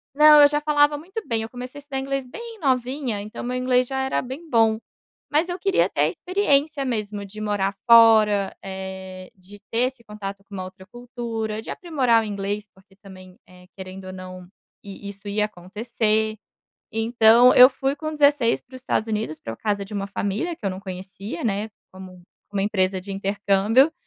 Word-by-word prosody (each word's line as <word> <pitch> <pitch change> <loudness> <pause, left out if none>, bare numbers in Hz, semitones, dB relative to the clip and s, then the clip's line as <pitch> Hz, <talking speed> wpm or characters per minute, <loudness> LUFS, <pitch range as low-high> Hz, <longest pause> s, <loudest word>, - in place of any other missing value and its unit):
Não, 300 0 +8
eu 290 - +9
já 295 +1 0
falava 295 -1 +3
muito 380 +9 -7
bem, 225 -1 -1
eu 225 - -7
comecei 250 +3 -8
a - - -12
estudar 275 -1 -5
inglês 275 -1 -3
bem 460 - -9
novinha, 255 -4 -1
então 210 +1 -8
o - - -5
meu 250 +1 -2
inglês 250 0 +2
já 265 -1 -2
era 265 - 0
bem 280 +6 -8
bom, 225 -2 +3 0.5
mas 320 +4 +2
eu 355 - -4
queria 390 -1 +2
ter - - -1
a - - +4
experiência 310 -6 0
mesmo 210 -4 -3
de 215 +2 -11
morar 200 -2 -1
fora, 215 -4 +6
eh, 190 -1 -7
de 195 +2 -15
ter 230 - 0
esse 255 -3 -9
contato 200 -2 -7
com 200 - -16
uma 185 - -4
outra 190 0 -11
cultura, 230 -2 -5
de - - -11
aprimorar 255 -10 +1
o - - -5
inglês 205 +1 -4
porque 190 0 -24
também, 185 -2 -14
eh, 180 0 -17
querendo 190 0 -9
ou 185 - -7
não, 185 -1 -9 0.4
e 200 0 -9
isso 200 +1 -10
ia 210 +1 +1
acontecer, 215 +3 -1 0.6
então 225 +2 +5
eu 250 +1 +10
fui 270 +2 -2
com 310 +2 -4
16 285 -5 +3
para 260 +1 -14
os 255 - -13
Estados 225 -3 -1
Unidos, 210 -7 -3
para 115 0 -6
casa 205 -2 -2
de 205 - -13
uma 200 0 -2
família, 205 - -2
que - - -17
eu - - +1
não 185 +1 -7
conhecia, 190 +2 -7
né, 210 0 -1 0.2
com 185 -1 -12 0.3
uma 195 -1 0
empresa 190 -2 0
de 195 +2 -10
intercâmbio, 200 +8 +2
220 Hz, 195 wpm, -23 LUFS, 195-260 Hz, 0.6 s, eu